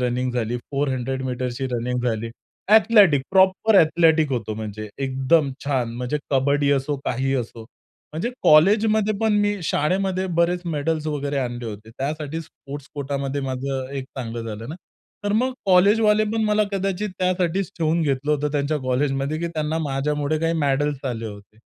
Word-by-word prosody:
Running 125 Hz, 0 st, -1 dB
झाली, 120 Hz, 0 st, -1 dB
400 135 Hz, -2 st, -1 dB
मीटरची 125 Hz, +1 st, -3 dB
running 125 Hz, +1 st, -1 dB
झाली. 115 Hz, +1 st, -4 dB, 0.4 s
एथलेटिक 205 Hz, -, +6 dB
प्रॉपर 190 Hz, +3 st, +4 dB
एथलेटिक 160 Hz, -1 st, +3 dB
होतो 115 Hz, -3 st, -2 dB
म्हणजे 110 Hz, 0 st, -6 dB, 0.2 s
एकदम 135 Hz, +3 st, +2 dB
छान. 130 Hz, -5 st, -1 dB
म्हणजे 125 Hz, +4 st, -2 dB
कबड्डी 140 Hz, +1 st, +2 dB
असो, 140 Hz, +1 st, 0 dB
काहीही 135 Hz, +2 st, 0 dB
असो. 120 Hz, -2 st, -4 dB, 0.5 s
म्हणजे 165 Hz, +11 st, -2 dB
कॉलेजमध्ये 215 Hz, +6 st, +4 dB
पण 220 Hz, -1 st, +2 dB
मी 205 Hz, 0 st, +1 dB
शाळेमध्ये 185 Hz, +5 st, 0 dB
बरेच 175 Hz, +1 st, +2 dB
मेडल्स 155 Hz, -1 st, -2 dB
वगैरे 145 Hz, -2 st, -2 dB
आणले 120 Hz, -2 st, -3 dB
होते. 110 Hz, +1 st, -8 dB
त्यासाठी 150 Hz, +3 st, -3 dB
स्पोर्ट्स 145 Hz, -2 st, -10 dB
कोटामध्ये 140 Hz, 0 st, -3 dB
माझं 130 Hz, 0 st, -3 dB
एक 135 Hz, -, -4 dB
चांगलं 120 Hz, -2 st, -4 dB
झालं 110 Hz, +1 st, -6 dB
ना. 155 Hz, -, -5 dB, 0.5 s
तर 205 Hz, -, 0 dB
मग 255 Hz, +4 st, +1 dB
कॉलेजवाले 210 Hz, +3 st, +4 dB
पण 225 Hz, -1 st, +1 dB
मला 210 Hz, 0 st, +2 dB
कदाचित 195 Hz, +1 st, -1 dB
त्यासाठीच 185 Hz, 0 st, 0 dB
ठेवून 165 Hz, +1 st, +1 dB
घेतलं 140 Hz, 0 st, 0 dB
होतं 150 Hz, 0 st, 0 dB
त्यांच्या 145 Hz, +1 st, 0 dB
कॉलेजमध्ये 135 Hz, +3 st, -1 dB
की 170 Hz, -, -2 dB
त्यांना 155 Hz, -1 st, -2 dB
माझ्यामुळे 150 Hz, +1 st, -1 dB
काही 165 Hz, 0 st, +1 dB
मेडल्स 145 Hz, 0 st, 0 dB
आले 115 Hz, -1 st, -4 dB
होते. 105 Hz, 0 st, -11 dB
145 Hz, 150 wpm, -23 LUFS, 130-170 Hz, 0.5 s, एथलेटिक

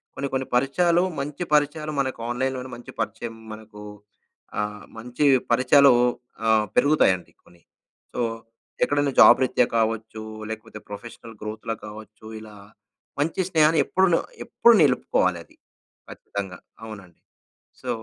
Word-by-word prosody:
కొన్ని 140 Hz, -, -3 dB
కొన్ని 130 Hz, 0 st, -1 dB
పరిచయాలు 170 Hz, +7 st, +2 dB, 0.2 s
మంచి 145 Hz, +5 st, -4 dB
పరిచయాలు 150 Hz, +1 st, +1 dB
మనకు 130 Hz, -3 st, -2 dB
ఆన్‌లైన్‌లోనే 130 Hz, +1 st, -2 dB
మంచి 120 Hz, -, -11 dB
పరిచయం 115 Hz, +1 st, -4 dB, 0.2 s
మనకు 110 Hz, -1 st, -12 dB, 0.8 s
ఆహ్, 105 Hz, -1 st, -4 dB
మంచి 125 Hz, +5 st, -2 dB, 0.3 s
పరిచయాలు 130 Hz, +3 st, +6 dB, 0.6 s
ఆహ్, 110 Hz, -1 st, +4 dB
పెరుగుతాయండి 140 Hz, -11 st, +3 dB
కొన్ని. 85 Hz, -1 st, -22 dB, 0.5 s
సో, -, -, -2 dB, 0.6 s
ఎక్కడైనా 145 Hz, -1 st, +1 dB
జాబ్ 130 Hz, -, +8 dB
రీత్యా 125 Hz, -1 st, +2 dB
కావచ్చు 110 Hz, -1 st, -2 dB, 0.3 s
లేకపోతే 110 Hz, -1 st, -8 dB
ప్రొఫెషనల్ 115 Hz, +2 st, -10 dB
గ్రోత్‌లో 110 Hz, +1 st, -5 dB
కావచ్చు 110 Hz, +1 st, -12 dB
ఇలా 110 Hz, -1 st, -12 dB, 0.7 s
మంచి 165 Hz, +5 st, 0 dB
స్నేహాన్ని 155 Hz, 0 st, +4 dB
ఎప్పుడు 190 Hz, 0 st, +2 dB
నొ -, -, +2 dB, 0.3 s
ఎప్పుడు 235 Hz, -, +5 dB
నిలుపుకోవాలది. 90 Hz, -, +1 dB, 0.5 s
ఖచ్చితంగా, 95 Hz, -2 st, -7 dB, 0.3 s
అవునండి. 100 Hz, -6 st, -11 dB, 0.6 s
సో 130 Hz, -, -6 dB
120 Hz, 115 wpm, -24 LUFS, 110-140 Hz, 0.8 s, జాబ్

